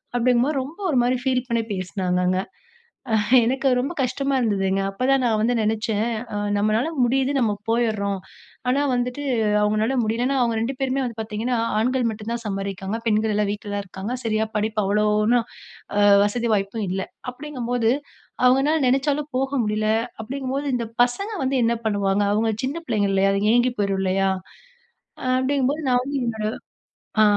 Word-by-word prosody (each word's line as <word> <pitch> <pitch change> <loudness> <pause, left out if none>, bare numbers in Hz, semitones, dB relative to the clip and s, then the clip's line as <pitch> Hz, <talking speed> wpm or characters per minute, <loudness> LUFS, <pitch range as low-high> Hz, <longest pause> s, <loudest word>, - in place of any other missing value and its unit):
அப்படிங்கும்போது 250 +4 +2
ரொம்ப 305 +9 -10
ஒரு 260 - +3
மாதிரி 250 +1 +2
ஃபீல் 255 -1 0
பண்ணி 230 -1 +1
பேசினாங்கங்க. 185 0 0 1.0
எனக்கு 265 +3 0
ரொம்ப 275 +7 -2
கஷ்டமா 275 +2 0
இருந்ததுங்க. 195 -4 +1
அப்ப 195 +6 -3
தா 270 - +6
நா - - +3
வந்து 240 +3 +2
நினைச்சேன், 220 0 0 0.5
நம்மளால 215 +7 +1 0.2
முடியுது 265 +3 +2
நம்ம 225 -4 +2 0.2
போயிற்றோம். 215 -4 0 0.5
ஆனா 275 +3 +2
வந்துட்டு 250 +3 -2 0.4
அவங்களால 215 +5 +1
முடியலன்னா 245 +5 0
அவங்க 235 -2 +1
2 240 +5 -1
பேருமே 270 0 0
வந்து 235 -3 -4
பார்த்தீங்கன்னா 220 +3 -2 0.2
ஆண்கள் 250 +1 +1
மட்டு 215 0 -8
தா 235 - 0
சம்பாதிக்கிறாங்க. 195 +1 -3
பெண்கள் 215 0 +2
எல்லா 210 0 +2
வீட்ல 205 0 -6
தான் 200 - -2
இருக்காங்க. 195 +6 -5
சரியா 220 -1 +1
படிப்பு 215 0 0
அவ்வளோன்னும் 210 +3 +2 0.8
வசதி 230 +3 0
வாய்ப்பும் 200 +1 -2
இல்ல. 190 +1 -1 0.3
அப்படிங்கும்போது 245 -4 -1 0.5
அவங்கனால 270 +5 +4
நினைச்சாலும் 285 +3 +1
போக 270 +1 -1
முடியல. 215 0 0 0.3
அப்படிங்கும்போது 270 +4 -3
இந்த 235 -1 -2 0.2
பசங்க 395 - -2
வந்து 265 +1 0
என்ன 230 +1 +3
பண்ணுவாங்க. 200 -1 +1
அவங்க 220 +1 +1 0.2
சின்ன 285 +5 -3
பிள்ளைங்க 210 -6 +1
இல்லையா, 195 0 +3
அதுங்க 205 +2 +1
ஏங்கி 245 +1 +3
போயிறும் 195 -1 0
இல்லையா. 195 +1 +1 1.1
அப்படிங்கும்போது 275 +3 0
நான் 250 -1 +3
வந்து 280 +2 -3
என்னோட 220 -2 -2 0.8
ஆ - - +7
230 Hz, 150 wpm, -23 LUFS, 210-260 Hz, 1.1 s, ஆ